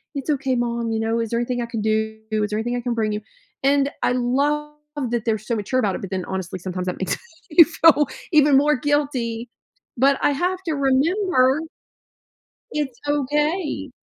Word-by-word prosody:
"It's 280 +2 -4
okay, 270 -2 0
mom, 235 -1 -1
you 220 - -1
know? 225 +1 0
Is 230 -2 -2
there 235 - +1
anything 245 0 -1
I 235 - -3
can 230 -2 -4
do? 220 0 0
Is 210 -1 0
there 210 - -1
anything 240 +2 -2
I - - -3
can 240 -1 -2
bring 215 -2 0
you?" 210 - -3 0.4
And 280 +1 +3
I 245 - +2
love 285 +5 0 0.4
that 235 -2 -1
they're 225 -2 +1
so 225 +3 -3
mature 220 +5 -1
about 200 -5 +1
it, - - -6
but 195 - -6
then, 185 -1 -2
honestly, 190 -1 -4
sometimes 185 0 -4
that 180 - -2
makes 190 - -1 0.3
me 335 +2 +9
feel 320 -3 +4 0.3
even 295 -2 +6
more 295 +2 +4
guilty, 255 -5 -1 0.5
but 275 +3 +4
I - - +4
have 360 +6 0
to 320 - -1
remember 280 +1 +2 1.1
it's 280 -5 -3
okay, 295 +4 0
255 Hz, 190 wpm, -22 LUFS, 225-290 Hz, 1.1 s, me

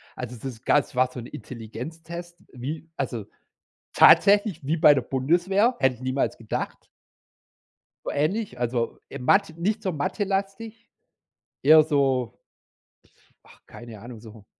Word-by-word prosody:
Also 125 -1 -6
es 115 - -12
ist 120 -2 -7
ganz 145 -3 +2
war 130 0 +3
so 125 - -8
'n 115 - -8
Intelligenztest, 160 +11 -9 0.2
wie 150 +6 -6
also 120 -7 -4 0.7
tatsächlich 200 -6 +5
wie 160 +4 0
bei 150 - +7
der 135 - 0
Bundeswehr, 175 - +1
hätte 130 -2 +2
ich 120 - -18
niemals 130 +1 -1
gedacht. 110 -1 -5 1.2
So - - -2
ähnlich, 155 - -1
also, 120 -1 -2
äh, - - -7
mat 160 +7 +2
nicht 210 +5 -1
so 190 - -1
mathelastig, 200 +7 -3 0.7
eher 155 +3 +8
so 135 -6 0 1.1
ach, - - -20
keine 115 -3 -11
Ahnung 120 0 -10
so 110 -2 -14
140 Hz, 135 wpm, -25 LUFS, 125-175 Hz, 1.2 s, eher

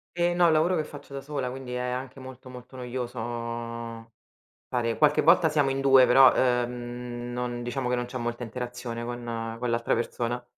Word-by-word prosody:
E 175 0 +2
no, 175 0 +4
è - - +7
un 160 - +4
lavoro 165 +4 +3
che 155 - 0
faccio 145 -2 -11
da 135 - -5
sola, 140 -3 -3
quindi 130 -1 -7
è 125 - -2
anche 125 +2 -4
molto, 130 0 -11
molto 125 +1 -11
noioso 125 -1 -5 1.5
fare 115 -2 -1
qualche 150 -1 +4
volta 160 - +6
siamo 145 -3 +2
in 135 0 -1
2, 135 -1 +7
però, 130 +1 +7
ehm, 120 -1 -1
non 120 0 -3
diciamo 125 +1 -2
che 125 - +1
non 120 0 -1
c'è 130 +1 -6
molta 120 0 -3
interazione 120 0 -5
con 120 0 -5 0.3
con 125 0 -2
l'altra 115 0 +1
persona. 120 +1 -2
125 Hz, 195 wpm, -27 LUFS, 120-135 Hz, 1.5 s, è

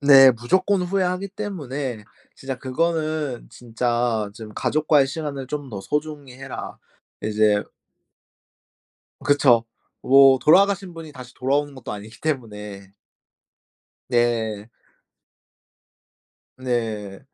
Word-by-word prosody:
네. 135 -2 +8
무조건 185 - +1
후회하기 185 +1 -1
때문에 145 - -5 0.3
진짜 135 -1 -6
그거는 155 -1 -2
진짜 120 -2 -1
좀 110 -1 -10
"가족과의 150 -2 +2
시간을 140 -2 -5
좀 145 -2 -5
더 100 -2 -6
소중히 150 -1 -4
해라." 135 0 -8 0.4
이제 105 -1 +2 1.6
그쵸. 135 -5 +4 0.4
뭐 135 0 +7
돌아가신 195 +4 +4
분이 160 -2 -10
다시 130 -2 -11
돌아오는 140 +2 0
것도 130 - -7
아니기 105 +2 -10
때문에. 105 -9 -5 1.1
네. 115 -3 0 1.9
네. 110 -6 -3
135 Hz, 210 characters per minute, -23 LUFS, 115-155 Hz, 1.9 s, 네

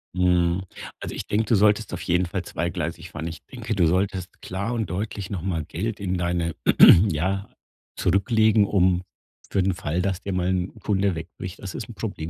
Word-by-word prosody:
Mhm. 90 0 +2 0.4
Also, - - -6
ich - - -5
denke, 110 +2 0
du 115 - +4
solltest 105 0 +3
auf 90 - -4
jeden 90 +1 +1
Fall 90 +1 -3
zweigleisig 85 -1 -4
fahren. 80 0 -5
Ich 80 -1 -6
denke, 115 -3 -4
du 85 -4 +4
solltest 95 +1 -1
klar 100 +6 -3
und 115 -2 -2
deutlich 100 +1 -4
noch 95 - -3
mal 85 -4 -2
Geld 105 +7 -4
in 95 -2 -1
deine 85 -2 -1 0.6
ja, 95 +6 -1 0.5
zurücklegen, 110 +3 +3
um 90 -2 +2 0.5
für 95 - +1
den 95 0 +1
Fall, 85 -1 -2
dass 95 0 -1
dir 100 - -4
mal 90 0 0
'n 90 -1 -2
Kunde 100 -2 +1
wegbricht. 90 +3 -7
Das 95 -2 -7
ist 110 - -5
'n 115 - -9
Problem, 90 -6 -5
95 Hz, 190 wpm, -24 LUFS, 85-100 Hz, 0.6 s, du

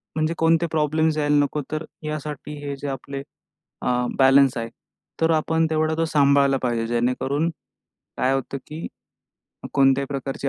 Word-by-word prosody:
म्हणजे 155 +1 0
कोणते 165 +1 +3
प्रॉब्लेम 155 +1 +2
यायला 150 -1 +2
नको, 150 +1 -2
तर 155 +1 -3 0.2
यासाठी 150 -1 -5
हे 140 - -3
जे 145 - -4
आपले 135 +1 -5 0.6
अ, - - -3 0.3
बॅलन्स 135 -1 +5
आहे. 115 0 -3 0.5
तर 165 0 +4
आपण 160 +1 +2
तेवढा 155 0 +1
तो 165 - +2
सांभाळला 140 -3 +3
पाहिजे, 120 -2 0
जेणेकरून 125 +6 0 0.7
काय 130 +1 +2
होतं 135 +1 -2
की 155 +2 -6 0.9
कोणत्याही 135 0 +4
प्रकारची 135 0 -3
145 Hz, 145 wpm, -23 LUFS, 135-155 Hz, 0.9 s, बॅलन्स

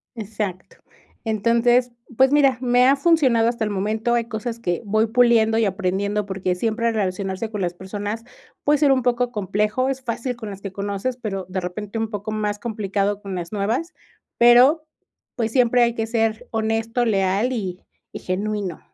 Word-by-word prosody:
Exacto. 210 -4 -5 0.5
Entonces, 235 +3 +2 0.3
pues 265 0 +5
mira, 275 -3 +4
me 245 0 +4
ha 275 - +5
funcionado 275 -8 +3
hasta 235 -1 -1
el 215 - -1
momento. 215 +4 -1
Hay 235 -1 +1
cosas 230 0 -5
que 175 -7 -2
voy 215 +2 +2
puliendo 225 -1 +4
y 225 - +3
aprendiendo 200 +1 -1
porque 190 -2 -2
siempre 230 +4 0
relacionarse 195 0 -2
con 210 -2 -4
las 175 -1 -1
personas 205 +4 -5 0.4
puede 295 0 +3
ser 290 -2 +4
un 260 -2 +2
poco 245 0 +1
complejo. 210 +4 0
Es 265 -1 -3
fácil 245 0 -3
con 225 -3 -7
las 195 -1 -9
que 195 -1 -7
conoces, 200 +5 -3
pero 195 -6 -4
de 185 0 -2
repente 200 +4 -5
un 225 -1 -1
poco 210 0 -5
más 210 -1 -2
complicado 205 -2 -2
con 195 -2 -6
las 175 -2 -5
nuevas. 220 - -1 0.4
Pero, 250 +7 +6 0.5
pues, 230 -3 -1
siempre 245 0 +3
hay 235 0 +1
que 225 -1 -2
ser 225 -1 -1
honesto, 225 +2 0
leal, 200 +2 +1
y 185 -6 -4 0.4
y - - -4
genuino. 200 -1 -3
220 Hz, 175 wpm, -22 LUFS, 200-240 Hz, 0.5 s, Pero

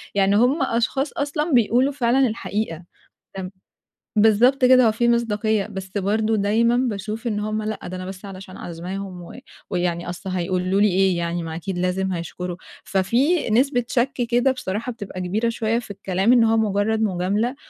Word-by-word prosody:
يعني 200 0 +3
هُم 250 +7 +3
أشخاص 265 +4 0
أصلًا 300 +3 -1
بيقولوا 245 +3 +3
فعلًا 260 0 +2
الحقيقة. 210 -6 -3 0.5
تم 185 -1 -5 0.7
بالضبط 225 +5 +4
كده، 255 -2 +6
هو - - +4
في 235 +2 +1
مصداقيَّة. 220 -3 +1
بس 190 -1 -6
برضه 215 +3 +1
دايمًا 225 +4 +2
باشوف 220 -1 -2
إن 210 -3 -1
هُم 215 +1 -2
لأ، 215 0 -4
ده 185 - -6
أنا 185 - -6
بس 190 +1 -8
علشان 190 -1 -9
عازماهم 180 +2 -6
و 170 - -11 0.3
ويعني 175 -2 -1
أصل 180 +2 -6
هيقولوا 185 +2 0
لي 210 - +6
إيه 190 -1 +2
يعني، 170 0 -2
ما 160 -1 -5
أكيد 180 +2 -4
لازم 185 +1 -1
هيشكروا. 175 +1 -5 0.3
ففي 240 - +1
نسبة 245 +2 +2
شَك 255 +2 +1
كده 245 +2 +1
بصراحة 235 -1 -4
بتبقى 205 -5 -8
كبيرة 210 +6 0
شويَّة 230 0 0
في 225 -4 -9
الكلام، 195 +2 0
إن 240 -2 +5
هو 225 0 +3
مجرَّد 215 +1 +1
مجاملة 205 +5 0
210 Hz, 170 wpm, -22 LUFS, 185-235 Hz, 0.7 s, كده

